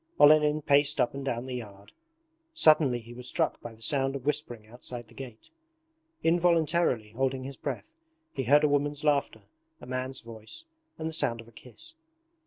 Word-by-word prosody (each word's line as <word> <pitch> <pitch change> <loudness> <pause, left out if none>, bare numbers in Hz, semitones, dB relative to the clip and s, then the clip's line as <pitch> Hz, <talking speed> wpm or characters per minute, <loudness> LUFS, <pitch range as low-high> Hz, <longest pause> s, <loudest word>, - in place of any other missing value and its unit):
Olenin 150 0 +6
paced 145 +1 +3
up 120 - +2
and 140 0 -5
down 120 -2 -2
the 130 - -6
yard. 100 -5 -8 0.6
Suddenly 155 - +5
he 115 +1 -12
was 125 +1 -6
struck - - 0
by 115 -1 -8
the 110 - -10
sound 135 0 +1
of 135 - -6
whispering 145 -7 -2
outside 120 +1 -8
the 115 - -19
gate. 125 - -10 0.7
Involuntarily 165 -8 +2
holding 130 +2 -1
his 135 +1 -7
breath, 320 - -6 0.4
he 135 - -3
heard 145 +5 +5
a - - +5
woman's 145 0 0
laughter, 145 -2 +1 0.4
a - - -11
man's 130 +1 -4
voice, 115 - -11 0.3
and 160 - -3
the 160 - -4
sound 135 -7 +1
of 115 - -11
a - - -16
kiss. 125 - -10
135 Hz, 180 wpm, -28 LUFS, 120-150 Hz, 0.7 s, Olenin